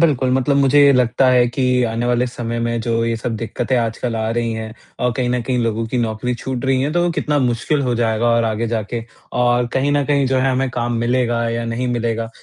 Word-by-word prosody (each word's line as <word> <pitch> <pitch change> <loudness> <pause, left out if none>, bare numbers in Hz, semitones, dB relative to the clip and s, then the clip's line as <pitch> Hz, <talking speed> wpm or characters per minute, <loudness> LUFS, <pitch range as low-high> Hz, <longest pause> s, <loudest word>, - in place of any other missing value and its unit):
बिल्कुल, 135 -6 +2
मतलब 130 +2 +2
मुझे 140 +1 +4
ये 140 - +6
लगता 125 +1 +2
है 125 -1 +4
कि 125 0 +1
आने 115 +1 -2
वाले 125 +1 +1
समय 120 -1 -4
में 115 0 -1
जो 115 0 0
ये 115 0 -1
सब 115 0 -3
दिक्कतें 115 +3 -2
आजकल 115 0 -2
आ 110 0 -1
रही 115 -1 -1
हैं 110 0 -6 0.3
और 125 -1 +1
कहीं 125 0 -1
न 125 0 0
कहीं 125 +1 -1
लोगों 115 0 -1
की 125 +3 -2
नौकरी 115 +1 -1
छूट 130 +2 -5
रही 130 -1 +2
है 145 +3 -1
तो 175 0 +1
कितना 150 -3 0
मुश्किल 130 +3 0
हो 125 -2 0
जाएगा 115 -1 0
और 115 0 +3
आगे 110 +1 -1
जाके। 115 +1 -3 0.4
और 120 0 +2
कहीं 135 +2 +1
न 145 -1 +2
कहीं 140 -1 +1
जो 130 0 +1
है 135 +1 +2
हमें 130 +1 0
काम 120 0 -2
मिलेगा 120 0 0
या 115 0 -2
नहीं 115 +2 -2
मिलेगा 115 -1 -2
120 Hz, 235 wpm, -19 LUFS, 115-130 Hz, 0.4 s, ये